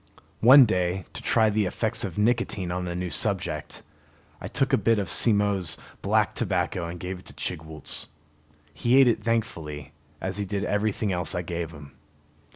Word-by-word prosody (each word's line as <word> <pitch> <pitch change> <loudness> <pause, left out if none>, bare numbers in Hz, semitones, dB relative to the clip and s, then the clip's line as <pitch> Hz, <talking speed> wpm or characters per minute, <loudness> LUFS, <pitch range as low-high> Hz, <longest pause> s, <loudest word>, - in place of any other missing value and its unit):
One 130 +3 +9
day, 90 -3 -1
to - - -7
try 110 -2 +3
the 105 -2 +1
effects 110 +4 -2
of 95 -5 -5
nicotine 105 -5 0
on 90 0 -3
a 85 - -4
new 90 -1 -3
subject, 90 -8 -2 0.6
I - - -5
took - - 0
a - - +6
bit 115 -1 +3
of 100 -5 -2
Simmo's 100 -6 +2 0.2
black - - +2
tobacco 85 -2 -1
and 85 +1 -7
gave 90 +1 -5
it - - -18
to - - -12
Chigwooltz. 80 -1 -5 0.7
He 120 - +3
ate 135 - +7
it 120 - +1
thankfully, 85 -11 -3 0.3
as 95 +1 -3
he 100 - -2
did 100 0 -2
everything 105 0 0
else 90 +1 -1
I 90 - -2
gave 85 -1 -4
him. 75 -3 -12
95 Hz, 175 wpm, -26 LUFS, 85-110 Hz, 0.7 s, One